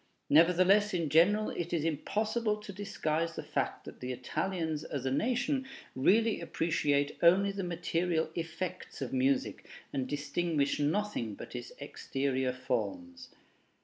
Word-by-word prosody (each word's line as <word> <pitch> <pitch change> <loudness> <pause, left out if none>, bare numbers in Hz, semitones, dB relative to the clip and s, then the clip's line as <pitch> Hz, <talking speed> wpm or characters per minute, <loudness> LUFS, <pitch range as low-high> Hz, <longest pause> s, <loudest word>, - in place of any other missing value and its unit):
Nevertheless, 185 +6 +5
in 165 -4 0
general 200 +8 +4
it 175 0 -4
is 160 -3 +1
impossible 215 +7 0
to 210 -1 -9
disguise 165 -5 -2
the - - -5
fact - - -2
that - - -10
the 125 0 -4
Italians 160 +5 -2
as 140 -4 -4
a 130 - 0
nation 250 - 0 0.3
really 215 +11 +3
appreciate 145 -3 0
only 190 +4 +5
the 195 -1 -4
material 170 -1 -1
effects 170 -1 -5
of 130 - -5
music, 130 +1 +1 0.3
and 135 -2 -1
distinguish 145 +1 0
nothing 150 - -1
but - - -9
its 120 -1 -6
exterior 135 -2 -2
forms. 260 - -4
165 Hz, 135 wpm, -31 LUFS, 145-200 Hz, 0.3 s, Nevertheless